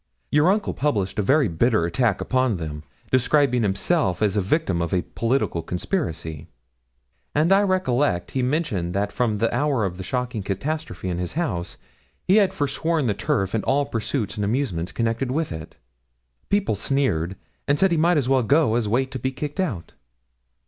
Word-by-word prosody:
Your 150 +4 +4
uncle 205 +2 +1
published 105 -10 -1
a - - +4
very 135 +6 +3
bitter 100 +2 +2
attack 100 +4 +1
upon 130 -5 +1
them, 75 -3 -5 0.3
describing 130 0 +3
himself 105 - +1
as 105 -3 +2
the 105 - +1
victim 95 - 0
of 85 +3 -2
a 90 - +1
political 115 -7 -1
conspiracy: 80 - -3 0.9
and 155 +5 +3
I 195 - +5
recollect 145 - +1
he 130 - -1
mentioned 125 - -1
that 100 +1 0
from 110 -3 0
the 115 +2 0
hour 140 -7 +1
of 90 -2 -4
the 95 - -6
shocking 125 +1 -2
catastrophe 100 - -4
in 90 -1 -2
his 90 -1 -3
house, 105 - -2 0.5
he 190 - +5
had 200 -3 +4
forsworn 150 +2 -1
the 110 - +2
turf 95 -1 -1
and 110 - 0
all 140 +2 +2
pursuits 115 -3 -3
and 105 - -1
amusements 100 -7 -1
connected 115 +2 -1
with 155 +4 -1
it. 80 -1 -8 0.7
People 200 - +1
sneered, 100 - 0 0.3
and 140 - +3
said 190 +4 +3
he - - +3
might 170 +2 +3
as 135 -4 +1
well 135 -1 +3
go 140 0 +3
as 115 -3 0
wait 130 +4 +1
to 130 - -4
be 130 +3 -1
kicked 145 +5 -6
out.' 125 - -2
120 Hz, 180 wpm, -23 LUFS, 95-145 Hz, 0.9 s, I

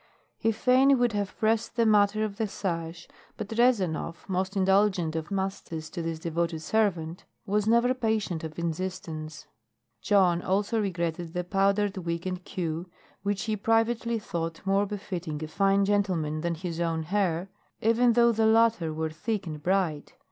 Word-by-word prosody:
He 225 - +2
fain 260 +5 +4
would 245 -1 +2
have 205 -1 -3
pressed 225 +1 0
the 230 -1 +3
matter 210 0 +4
of 205 -2 -3
the 220 -1 0
sash, 170 -4 -4 0.3
but 215 -2 -5
Rezanov, 200 -9 +1
most 190 +1 -1
indulgent 190 -4 +2
of 160 -1 -3
masters 190 -5 -4
to 170 - -4
this 165 -1 -3
devoted 165 0 -2
servant, 175 -5 0 0.2
was 210 +1 0
never 235 +2 +4
patient 220 -9 -1
of 155 -1 -7
insistence. 165 -2 -4 0.6
Jon 180 - +3
also 205 +5 0
regretted 170 -3 -3
the 180 -1 -1
powdered 195 +2 +1
wig 170 -1 -3
and 185 0 -3
queue, 170 -2 -4 0.3
which 200 -1 -1
he 220 -1 -1
privately 225 +2 +1
thought 165 -5 -4
more 195 +1 +2
befitting 180 -7 -5
a - - -4
fine 195 +4 +2
gentleman 180 -7 0
than 170 0 -1
his 170 0 -5
own 165 -1 0
hair, 185 0 -1 0.3
even 230 +2 +3
though 235 0 +5
the 220 -1 +2
latter 225 -7 +3
were 160 0 -3
thick 205 +5 -3
and 155 -3 -6
bright. 175 -4 0
190 Hz, 160 wpm, -27 LUFS, 165-215 Hz, 0.6 s, though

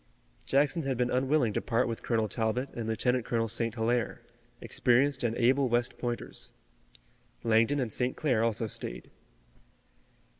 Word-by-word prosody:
Jackson 145 +4 +2
had 135 -4 -2
been 125 0 0
unwilling 130 -3 +2
to - - -1
part 120 +2 +1
with 115 -1 -4
Colonel 110 -2 0
Talbot 120 +4 -1
and 115 -2 -4
Lieutenant 125 +2 +1
Colonel 115 0 0
St. 115 0 -1
Hilaire, 120 +1 0 0.4
experienced 130 +2 +2
and 115 -1 0
able 130 +2 +3
West 120 +1 0
Pointers. 120 -1 -5 0.9
Langdon 115 +5 +3
and 120 -5 -1
St. 125 0 -1
Clair 125 -8 +1
also 115 0 0
stayed. 80 - -6
120 Hz, 145 wpm, -29 LUFS, 115-130 Hz, 0.9 s, able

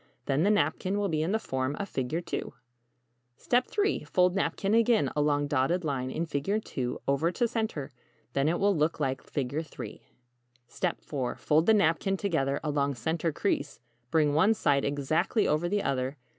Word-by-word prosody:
Then 135 +2 +1
the 195 - +3
napkin 190 +1 +1
will 205 -1 0
be 155 -2 0
in 165 +4 0
the 220 - +2
form 130 -7 -2
of 200 - -4
=Figure 155 +3 -2
II= - - +1 1.0
3. 365 - +1
Fold 180 +4 +3
napkin 195 +1 0
again 230 - +3
along 145 -1 +2
dotted 145 +6 +1
line 130 -3 -1
in 165 +5 -2
=Figure 165 +7 -1 0.2
II= 125 -3 -1
over 140 +5 +2
to 240 +5 +1
center. 220 - -3 0.4
Then 140 +2 +2
it 170 - 0
will 200 0 +3
look 155 +1 +1
like 135 -2 -1
=Figure 140 +2 -2 0.2
III= 110 -4 -7 1.0
4. 135 -4 -4
Fold 155 +2 +2
the 220 - +6
napkin 195 +1 +2
together 140 -8 0
along 145 -2 0
center 160 +7 -1
crease, 150 -3 -2 0.3
bring 150 -1 +3
one 190 +9 +4
side 145 -7 +2
exactly 145 - +1
over 155 +4 +1
the 205 +1 0
other. 135 +1 -1
155 Hz, 170 wpm, -29 LUFS, 140-195 Hz, 1.0 s, the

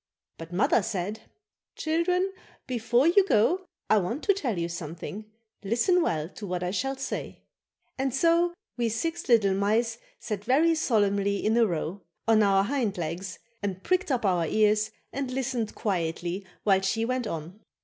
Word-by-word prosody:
But 165 +1 -8
mother 195 +5 +3
said: 200 +3 -4 0.5
"Children, 360 +4 0 0.3
before 240 +1 +1
you 355 +4 +6
go 355 - +2 0.2
I 215 - +5
want 215 - -3
to 400 - +4
tell 260 - -2
you 170 0 -1
something; 170 +5 -6 0.4
listen 235 - +2
well 155 - 0
to 205 +3 -9
what 180 -1 -2
I 180 - -1
shall 270 +7 -1
say." 270 - -5 0.6
And 270 0 +1
so 335 +6 +3 0.2
we 235 -1 +1
six 325 +10 -3
little 215 -5 +5
mice 220 +4 +1 0.2
sat 205 -3 -4
very 295 +8 +4
solemnly 200 -8 +1
in 220 +1 +3
a 235 -1 +5
row, 175 +2 -3 0.3
on 225 -1 +5
our 195 -1 +4
hind 230 -4 -1
legs 175 +3 -4 0.2
and 195 -2 -4
pricked 365 -2 +1
up 245 -4 0
our 175 -4 +2
ears 215 +2 +3 0.2
and 275 -1 -2
listened 255 -4 -2
quietly 175 0 -2 0.2
while 195 -2 +4
she 225 +4 0
went 255 -1 -1
on. 165 +3 -6
215 Hz, 160 wpm, -27 LUFS, 190-265 Hz, 0.6 s, you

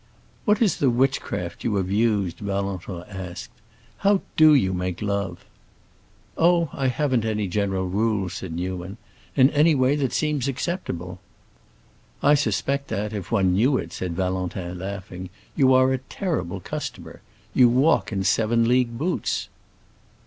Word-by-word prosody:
"What 210 +1 +3
is 200 -7 +2
the 135 - +3
witchcraft 120 -8 -1
you 110 - 0
have 95 -1 -1
used?" 105 -4 +1
Valentin 100 -3 -3
asked. 95 -3 -7 0.5
"How 200 -1 +3
do 155 -1 +7
you 95 -9 +2
make 90 -1 -3
love?" 100 -4 -3 0.9
"Oh, 170 -1 +3
I 135 -2 -1
haven't 130 -2 +1
any 105 -2 -1
general 95 0 -1
rules," 100 -1 0
said 95 - -6
Newman. 90 +3 -4 0.4
"In 130 0 +5
any 150 +1 +4
way 130 +1 +3
that 135 -4 0
seems 150 -1 0
acceptable." 120 - -4 1.0
"I 145 - +6
suspect 140 -1 0
that, 105 +2 -3
if 100 -3 -6
one 95 -5 +3
knew 125 +8 +3
it," - - -5
said 90 -2 -4
Valentin, 90 -1 -3
laughing, 95 -1 -6 0.3
"you 135 -3 +4
are 130 +1 +4
a 130 - -1
terrible 130 - -3
customer. - - -6 0.3
You 125 -2 +6
walk 125 -5 +3
in 95 -2 -1
seven 115 +3 +2
league 120 -1 +2
boots." 175 +7 -1
110 Hz, 145 wpm, -24 LUFS, 95-135 Hz, 1.0 s, do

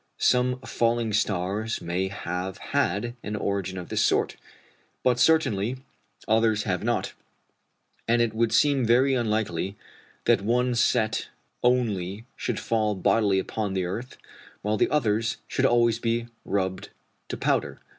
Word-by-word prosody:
Some 125 0 +2
falling 115 -3 0
stars 105 +2 0
may 90 +3 -2
have 95 -1 -4 0.2
had 120 -5 +1
an 105 - -4
origin 100 -2 -2
of 90 - -7
this - - 0
sort, - - +2 0.7
but 125 -1 +3
certainly 125 -6 +3 0.5
others 110 -1 +3
have 95 -2 -1
not; 120 +1 -1 0.9
and 120 +1 +3
it 120 -2 +2
would 115 0 +1
seem 140 -3 +3
very 125 +4 +4
unlikely 105 -6 -1 0.5
that - - +4
one 125 +4 +1
set 115 -2 +1 0.3
only 110 -5 0
should 120 - -3
fall 110 -2 0
bodily 100 +1 +2
upon 100 +1 -2
the 95 -1 0
earth, 115 +8 -5 0.5
while 105 +1 +1
the - - +2
others 115 -6 +1
should - - +2
always 120 -1 +3
be 115 0 0 0.2
rubbed 95 -2 -2 0.4
to - - -4
powder. - - 0
110 Hz, 135 wpm, -26 LUFS, 100-120 Hz, 0.9 s, very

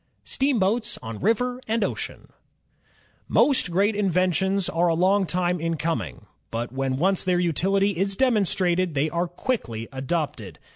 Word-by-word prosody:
Steamboats 235 -4 0
on 110 -1 -6
River 245 +4 0
and 225 0 +1
Ocean - - -4 1.0
Most 265 -10 +3
great 200 +5 +2
inventions 190 0 +1
are 170 +2 +1
a 165 - +2
long 190 +3 +3
time 180 -1 0
in 165 0 -1
coming, 155 - -3 0.2
but 115 +1 -4
when 135 0 -1
once 190 +5 +1
their 180 -1 +1
utiUty 195 +4 +1
is 195 +2 -1
demonstrated 185 - +1
they 150 +3 +1
are 170 +1 0
quickly 170 - -3
adopted. 130 - -3
180 Hz, 140 wpm, -24 LUFS, 160-200 Hz, 1.0 s, Most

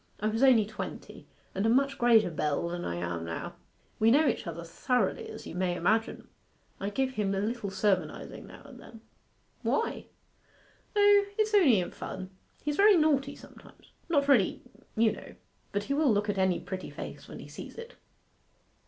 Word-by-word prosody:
I 215 - 0
was 225 +2 -2
only 250 -6 +6
twenty, 215 +1 -8 0.3
and 195 - -1
a 225 - +3
much 270 +3 +2
greater 230 -6 +5
belle 155 +1 -1
than 175 0 -4
I 85 - -3
am 85 -1 -3
now. 85 0 -5 0.5
We 220 - +5
know 290 +5 +5
each - - -1
other 170 0 -5
thoroughly, 250 - -1
as - - -9
you - - -8
may 180 0 -1
imagine. 220 +6 0 0.5
I 200 - -2
give 260 +5 -1
him 205 -5 -1
a - - 0
little 215 0 -2
sermonizing 190 -5 -2
now - - -13
and - - -13
then.' 225 -1 -13 0.6
'Why?' 460 - -1 0.9
'O, 410 0 +6
it's 430 0 +1
only 295 - +6
in 175 - -3
fun. 185 0 -7 0.3
He's 295 0 -2
very 405 -1 +6
naughty 285 -3 +2
sometimes - - -16 0.2
not 285 -4 +2
really, 245 -10 +3 0.3
you 225 -1 +4
know - - -10 0.4
but 205 0 -1
he 275 - -2
will 290 -2 +3
look 205 0 +1
at 200 -1 -1
any 190 -2 +2
pretty 190 -1 -6
face - - -8
when - - -9
he - - -10
sees - - -10
it. 465 +1 -9
220 Hz, 180 wpm, -29 LUFS, 190-280 Hz, 0.9 s, only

